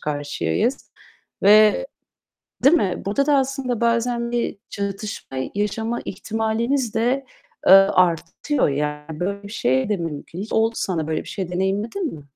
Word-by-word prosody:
karşıyayız. 145 - -2 0.5
Ve 215 - +6 0.8
değil 280 +5 +7
mi? 190 - -1
Burada 245 +8 +1
da 290 -1 +4
aslında 265 -3 -1
bazen 235 0 +1
bir 240 -4 -2
çatışma 200 -8 -5 0.2
yaşama 220 +3 -1
ihtimalimiz 225 +5 -1
de, 250 +4 +1 0.4
eee, - - +7
artıyor. 185 - +4
Yani, 150 +2 -3
böyle 200 +3 -2
bir 200 - -9
şey 130 - +1
de 210 - +1
mümkün. 165 0 -6
Hiç 210 - -6
oldu 225 +1 +2
sana 165 -5 -2
böyle 160 0 -2
bir - - -13
şey, 190 -4 -4
deneyimledin 205 - -1
mi? 150 - -11
210 Hz, 140 wpm, -22 LUFS, 175-235 Hz, 0.8 s, değil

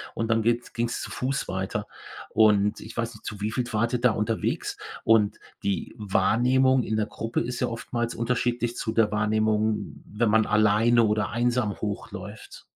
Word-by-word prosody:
und 115 - -1
dann 115 0 +3
geht's 120 +1 0
ging's 120 0 -2
zu - - -6
Fuß 135 +2 -2
weiter. 95 +2 -3 0.4
Und 105 -2 +3
ich 110 - -10
weiß 115 0 -2
nicht, 110 - -16
zu 105 - -6
wie 105 +1 -1
viel 125 +3 -1
wart 115 +3 +1
ihr 125 - 0
da 125 -2 +5
unterwegs? 110 +1 -2 0.3
Und 110 -2 +3 0.3
die 100 -4 -2
Wahrnehmung 125 +6 +3
in 110 - -1
der 105 - +1
Gruppe 115 +2 -3
ist 125 +1 -4
ja - - +2
oftmals 120 0 -3
unterschiedlich 120 0 -1
zu 110 - -2
der 110 -2 +2
Wahrnehmung, 110 +1 0
wenn 110 +2 0
man 110 -1 +4
alleine 110 +3 +4
oder 105 -2 +1
einsam 120 -2 0
hochläuft. 105 0 -6
110 Hz, 175 wpm, -26 LUFS, 105-120 Hz, 0.4 s, da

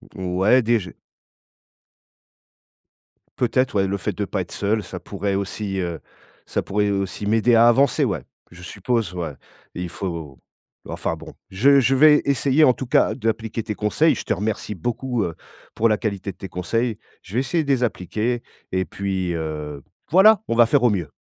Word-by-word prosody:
Ouais 95 +7 +2
déj 110 -7 0 2.5
Peut-être, 130 0 +1
ouais, 95 -1 +2
le 100 +1 -1
fait 105 +2 -3
de 105 - -2
pas 95 - -2
être 85 - -8
seul, 105 +1 -1
ça 90 0 -7
pourrait 100 0 -3
aussi, 100 0 -3
heu, 85 -3 -3 0.5
ça - - -2
pourrait 105 0 0
aussi 100 +1 -3
m'aider 115 +3 +3
à 115 +1 +6
avancer, 130 +2 +4
ouais, - - -2 0.3
je 90 +1 -13
suppose, 100 +1 -2
ouais. 85 -5 -4 0.4
Il 90 0 -5
faut 85 -9 -6 0.5
enfin, - - -3
bon, - - -11 0.2
je 135 +9 +5
je 135 +1 +2
vais 150 +2 +6
essayer, 140 +1 +3
en 130 -4 +6
tout 130 +3 -6
cas, 120 - +2
d'appliquer 115 -2 -2
tes 105 -1 -3
conseils, 110 +11 +2
je - - -5
te - - 0
remercie 105 +2 -3
beaucoup, 120 +4 -2
heu, 85 - -4 0.4
pour 115 +1 +2
la 110 - +2
qualité 100 -3 -3
de 90 - -21
tes 95 - -8
conseils. 110 +6 -2 0.2
Je 95 - -13
vais 120 - +2
essayer 135 +5 0
de 140 - -7
les 125 -2 +2
appliquer 110 +3 -2 0.3
et 95 0 0
puis, 95 0 -3
heu, 75 -3 -5 0.3
voilà! 210 +4 +6
On 115 - 0
va 120 - +7
faire 120 - +3
au 120 - +5
mieux. 85 -7 -2
105 Hz, 180 wpm, -22 LUFS, 95-120 Hz, 2.5 s, va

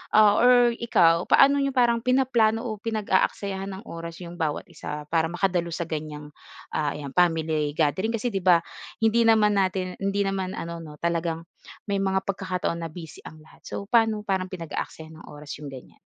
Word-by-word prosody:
ah, 210 -1 +6
or 245 0 +6
ikaw, 170 -7 +3
paano 280 +1 +6
ninyo 275 -1 0
parang 240 -2 +3
pinaplano 240 -3 +2
o 215 -3 -4
pinag-aaksayahan 200 -2 -1
ng - - -19
oras 170 +1 -7
'yong 175 0 -9
bawat 155 -3 -1
isa 150 0 -6
para 165 -1 +3
makadalo 175 -1 -1
sa 170 - -2
ganyang, 150 -2 -6 0.4
ah, 150 -2 -1
ayan, 140 -2 -7
family 160 -3 +1
gathering? 165 - +1
Kasi 230 +2 -1
'di 195 - -1
ba, 180 -2 +4 0.4
hindi 230 +1 +4
naman 210 -2 +4
natin 185 -1 -1
hindi 195 +1 0
naman 195 -1 -2
ano 170 0 -5
'no, 155 -2 -10
talagang 170 -1 -1 0.5
may 200 - +1
mga 190 0 +1
pagkakataon 185 -3 -2
na 165 - -4
busy 160 0 -10
ang 155 0 -12
lahat, 155 - -20
so - - -5
paano 225 -3 +3
parang 190 -3 -1
pinag-aaksayahan 160 -2 -7
ng - - -13
oras 145 0 -9
'yong 150 - -8
ganyan? 130 - -12
185 Hz, 180 wpm, -25 LUFS, 165-215 Hz, 0.5 s, ah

